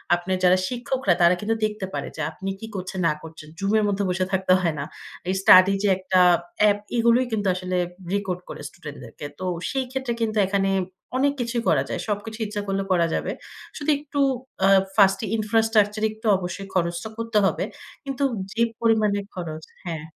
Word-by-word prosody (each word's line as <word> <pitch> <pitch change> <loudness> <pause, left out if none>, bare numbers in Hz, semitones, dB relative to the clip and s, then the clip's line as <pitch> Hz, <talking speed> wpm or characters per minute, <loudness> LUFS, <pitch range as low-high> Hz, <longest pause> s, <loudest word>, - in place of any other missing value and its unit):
আপনার 180 +2 -2
যারা 180 0 +6
শিক্ষকরা 250 -4 0
তারা 170 +1 +6
কিন্তু 220 +2 0
দেখতে 210 -2 -3
পারে - - -3
যে, - - -4
আপনি 195 - -6
কি 220 - -7
করছেন 190 0 -4
না 150 - +2
করছেন। 160 -1 -11
Zoom 195 0 0
এর - - +1
মধ্যে 200 0 0
বসে 185 +1 0
থাকতে 190 -1 +3
হয় 170 -3 +1
না। - - -2 0.5
এই - - +2
স্টাডি 185 0 +8
যে, - - +3
একটা 185 0 +1 0.4
অ্যাপ 210 -1 +5 0.2
এগুলোই 235 +2 +4
কিন্তু 205 -2 0
আসলে 185 0 -2 0.4
রেকর্ড 195 -3 -1
করে - - -7
স্টুডেন্ট 150 -4 -10
দেরকে। 120 +4 -9
তো 185 - -4 0.2
সেই 265 -1 -1
ক্ষেত্রে 265 -2 -2
কিন্তু 220 -1 0
এখানে 195 0 +1 0.5
অনেক 280 +1 +3
কিছুই 235 0 -1
করা - - +3
যায়। - - -3
সবকিছুই 220 +2 -3
ইচ্ছা 205 0 -3
করলে 195 0 0
করা 175 -2 +4
যাবে। - - -1 0.5
শুধু 295 0 -3
একটু 285 0 -5 0.5
আ - - +6 0.3
first 195 -2 +5 0.2
infrastructure 215 -1 +2
একটু 220 +1 -7
অবশ্যই 185 +2 -5
খরচটা 170 +3 -1
করতে 230 -1 -1
হবে। - - +1 0.4
কিন্তু 275 0 -2 0.3
যে, 230 - -1 0.2
পরিমাণে 215 -3 +3
খরচ 160 -3 -6 0.2
হ্যাঁ 165 -3 -4
200 Hz, 180 wpm, -24 LUFS, 185-225 Hz, 0.5 s, স্টাডি